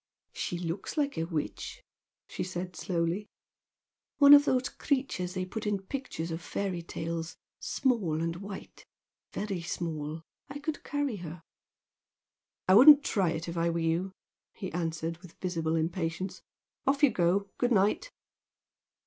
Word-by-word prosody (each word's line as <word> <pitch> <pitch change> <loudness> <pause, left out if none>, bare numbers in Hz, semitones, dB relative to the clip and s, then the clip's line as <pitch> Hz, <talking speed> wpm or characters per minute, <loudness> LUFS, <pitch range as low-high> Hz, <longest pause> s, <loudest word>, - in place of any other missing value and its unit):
"She 175 - -3
looks 175 - -4
like 285 -1 +1
a 165 - -1
witch," 160 -3 -4 0.4
she - - -4
said 180 0 -5
slowly 175 +2 -1 0.9
"One 285 0 +9
of 290 0 +9
those 255 -2 +2
creatures 255 - -1
they 185 0 -1
put 215 +3 -5
in 205 -1 +1
pictures 190 - -4
of 165 +1 -4
fairy 185 0 -3
tales, 165 0 -4 0.2
small 240 - 0
and 165 +1 -1
white. 195 +1 -9 0.4
Very 195 -4 -3
small, 160 -2 -4 0.3
I 280 - -6
could 295 +1 -4
carry 290 -6 -1
her." 165 -2 -8 1.2
"I 185 - +6
wouldn't 285 +7 +10
try 190 -9 +1
it 165 +1 -3
if 170 - -4
I 170 0 +2
were 170 - -1
you" 165 +3 0 0.4
he 190 - -6
answered, 165 -1 -2
with 180 -2 -15
visible 165 -3 -1
impatience 165 +2 -2 0.5
"Off 280 +2 +2
you 285 - +7
go! 195 +1 +1
Good 245 0 +2
night!" 210 - +2
180 Hz, 145 wpm, -30 LUFS, 165-220 Hz, 1.2 s, wouldn't